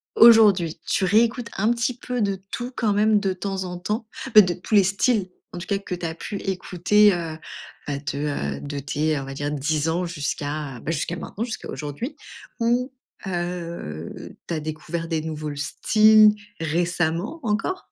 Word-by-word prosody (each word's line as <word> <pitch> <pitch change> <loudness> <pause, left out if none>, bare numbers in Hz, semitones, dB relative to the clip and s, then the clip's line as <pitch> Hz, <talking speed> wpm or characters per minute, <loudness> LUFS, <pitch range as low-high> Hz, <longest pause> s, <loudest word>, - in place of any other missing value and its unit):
aujourd'hui, 210 -8 +7
tu 195 - 0
réécoutes 230 +4 +2
un 215 +4 +2
petit 245 +1 0
peu 250 -1 -3
de 200 -2 0
tout, 245 +1 -4
quand 215 -4 +1
même, 210 0 +4
de 195 -2 0
temps 190 0 -3
en 180 -1 -5
temps? 215 +5 -3 0.3
Beh, 210 - +11
de 180 -1 0
tous 185 +5 -2
les 200 - +7
styles, 195 +1 +1 0.2
en - - -6
tout 175 - -6
cas, 200 -1 0
que 185 -2 -5
tu 175 - -6
as 160 - -2
pu 200 +3 -5
écouter, 195 +2 +3
heu, 165 -2 -4 0.5
bah, 140 -1 -2 0.2
de, 140 - -2
heu, - - -12
de 145 0 -5
tes, 150 +2 -1
on 135 - -6
va 135 - -6
dire, 145 +1 -3
10 150 +2 0
ans 175 +2 0
jusqu'à 145 -4 -4
bah, 165 - -3
jusqu'à 165 +2 -2
maintenant, 215 - -5
jusqu'à 235 -2 -6
aujourd'hui 145 - -5 0.4
ou 245 +3 +1 0.4
heu, 170 - -5
tu 170 - -3
as 155 - -1
découvert 155 +2 -4
des 160 -2 -1
nouveaux 155 -2 -5
styles, 215 +8 +5 0.2
récemment, 170 - -1
encore? 230 - -1
180 Hz, 180 wpm, -24 LUFS, 155-215 Hz, 0.5 s, Beh